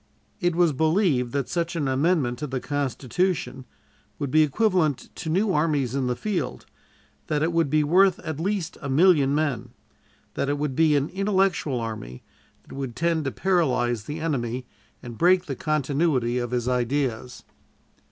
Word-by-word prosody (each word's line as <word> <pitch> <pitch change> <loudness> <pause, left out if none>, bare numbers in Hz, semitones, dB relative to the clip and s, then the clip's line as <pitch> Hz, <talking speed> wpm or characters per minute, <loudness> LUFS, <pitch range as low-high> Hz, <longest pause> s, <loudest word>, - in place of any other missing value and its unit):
It 175 -3 0
was 170 -3 +3
believed 155 - +1
that 140 -3 -1
such 170 0 -2
an 150 -4 -1
amendment 135 -2 +1
to 150 - -3
the 130 -1 -3
Constitution 140 +1 -2 0.5
would 140 -2 -3
be 155 - +5
equivalent 160 - +1
to 165 - -5
new 190 +4 +1
armies 150 -5 +1
in 135 -2 -1
the 125 - 0
field, 175 - -3 0.6
that 150 -1 0
it 165 +1 0
would 165 -3 +2
be 155 +1 +3
worth 185 +4 +4
at 155 -3 -5
least 185 -1 -2
a 140 - -5
million 145 -2 +4
men, 145 -7 -1 0.6
that 140 - -2
it 145 - 0
would 145 -2 -2
be 155 -1 +4
an 140 +1 +1
intellectual 190 -8 0
army 110 - -6 0.4
that - - -14
would 135 -4 -5
tend 165 -1 0
to 135 - -1
paralyze 125 - 0
the 150 +2 -5
enemy 125 -6 -2 0.4
and 120 -2 -9
break 180 +1 +4
the 135 - -4
continuity 140 -4 0
of 120 -1 -3
his 125 0 -2
ideas. 125 -1 -1
150 Hz, 165 wpm, -25 LUFS, 130-170 Hz, 0.6 s, be